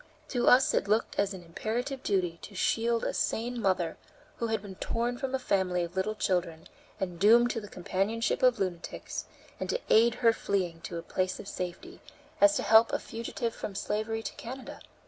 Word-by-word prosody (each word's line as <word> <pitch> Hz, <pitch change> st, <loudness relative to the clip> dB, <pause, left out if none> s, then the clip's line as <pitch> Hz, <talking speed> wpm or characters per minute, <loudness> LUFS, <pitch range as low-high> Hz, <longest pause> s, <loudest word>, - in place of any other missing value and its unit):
To 245 Hz, -3 st, 0 dB
us 255 Hz, +2 st, +6 dB
it -, -, +1 dB
looked 215 Hz, +2 st, +1 dB
as 200 Hz, 0 st, +2 dB
imperative 220 Hz, +9 st, -4 dB
a -, -, -27 dB
duty 180 Hz, -4 st, 0 dB
to 200 Hz, -, -10 dB
shield 230 Hz, +4 st, +1 dB
a -, -, -1 dB
sane 240 Hz, +1 st, -1 dB
mother, 185 Hz, -5 st, +1 dB, 0.4 s
who 235 Hz, -, -1 dB
had 220 Hz, -2 st, -1 dB
been 200 Hz, -2 st, -8 dB
torn 240 Hz, +5 st, -2 dB
from 265 Hz, 0 st, -2 dB
a -, -, +2 dB
family 190 Hz, -7 st, +1 dB
of 170 Hz, +1 st, -6 dB
little 200 Hz, +3 st, 0 dB
children 175 Hz, -5 st, -1 dB, 0.3 s
and 180 Hz, -3 st, -3 dB
doomed 235 Hz, +5 st, +6 dB
to 225 Hz, -, -3 dB
the 205 Hz, -, -9 dB
companionship 195 Hz, +5 st, -1 dB
of 250 Hz, -1 st, +5 dB
lunatics, 180 Hz, -3 st, -4 dB, 0.3 s
and -, -, -4 dB
to -, -, 0 dB
aid 230 Hz, +2 st, +6 dB
her 235 Hz, -, +4 dB
in -, -, +4 dB
fleeing 180 Hz, -6 st, -2 dB
to 170 Hz, -, -5 dB
a 165 Hz, -, -5 dB
place 185 Hz, +1 st, -1 dB
of -, -, -8 dB
safety, 185 Hz, -, -6 dB, 0.4 s
as 300 Hz, 0 st, +7 dB
to -, -, 0 dB
help 225 Hz, +1 st, +6 dB
a -, -, +1 dB
fugitive 230 Hz, 0 st, -4 dB
from 200 Hz, -, -6 dB
slavery 215 Hz, +2 st, -2 dB
to -, -, -4 dB
Canada. 255 Hz, +3 st, -8 dB
215 Hz, 200 wpm, -29 LUFS, 185-235 Hz, 0.4 s, as